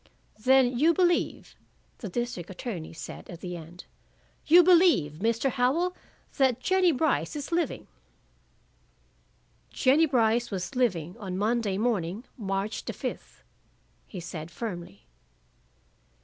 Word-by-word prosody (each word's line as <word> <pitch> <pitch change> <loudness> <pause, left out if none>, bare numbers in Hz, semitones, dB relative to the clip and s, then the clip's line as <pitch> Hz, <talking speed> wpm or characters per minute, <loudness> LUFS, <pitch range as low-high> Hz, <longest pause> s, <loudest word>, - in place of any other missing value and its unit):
"Then 255 +1 +4
you 325 +3 +4
believe," 350 -2 0 0.4
the 215 - -6
district 240 -4 -4
attorney 190 -3 -6
said 160 - -9
at 170 -2 -9
the 180 -1 -5
end, 170 +1 -11 0.6
"you 350 +3 +8
believe, 335 - +4
Mr. 230 +4 +1
Howell, 295 +9 +1 0.4
that 260 -4 +3
Jennie 375 +4 +3
Brice 265 - 0
is 290 +2 -5
living?" 340 0 -1 1.8
"Jennie 290 +5 +3
Brice 235 -3 +2
was 185 +2 -4
living 185 - 0
on 185 -3 -5
Monday 215 -1 0
morning, 210 -2 -1
March 195 -1 -3
the - - -5
fifth," - - -7 0.6
he 190 - -8
said 165 -1 -7
firmly. 175 - -7
230 Hz, 120 wpm, -27 LUFS, 180-270 Hz, 1.8 s, you